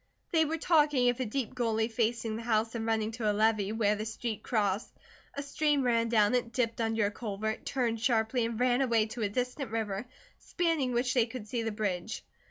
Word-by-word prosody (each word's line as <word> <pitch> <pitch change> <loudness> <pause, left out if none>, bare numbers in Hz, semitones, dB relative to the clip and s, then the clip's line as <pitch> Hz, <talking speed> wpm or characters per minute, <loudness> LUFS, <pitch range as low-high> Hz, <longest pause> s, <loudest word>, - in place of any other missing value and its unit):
They 320 -2 +4
were 320 +2 -1
talking 295 -6 +3
of 245 +1 -1
a 255 - 0
deep 255 +2 -3
gully 225 -3 0
facing 230 -1 -1
the 225 - -5
house 225 -1 +1
and 225 -1 -3
running 220 -1 0
to 220 -2 0
a - - -1
levee 215 -1 +2
where 215 -2 +2
the 210 - -4
street 220 -1 -4
crossed. 205 -2 0 0.4
A 280 - -3
stream 290 0 +1
ran 230 -2 +2
down 215 -1 +4
it, 245 -2 0
dipped 235 -2 -1
under 225 -1 +1
a 205 - 0
culvert, 220 0 -4
turned 235 -4 -1
sharply, 230 +1 +2
and 230 0 -2
ran 250 +1 +3
away 230 -4 +3
to 225 +2 -7
a 205 - +1
distant 250 +4 -2
river, 220 0 -3 0.3
spanning 325 -8 0
which 245 +1 +1
they 245 -3 +3
could 230 -3 -7
see 235 +2 -2
the 225 0 -2
bridge. 205 -1 -3
230 Hz, 210 wpm, -30 LUFS, 220-250 Hz, 0.4 s, They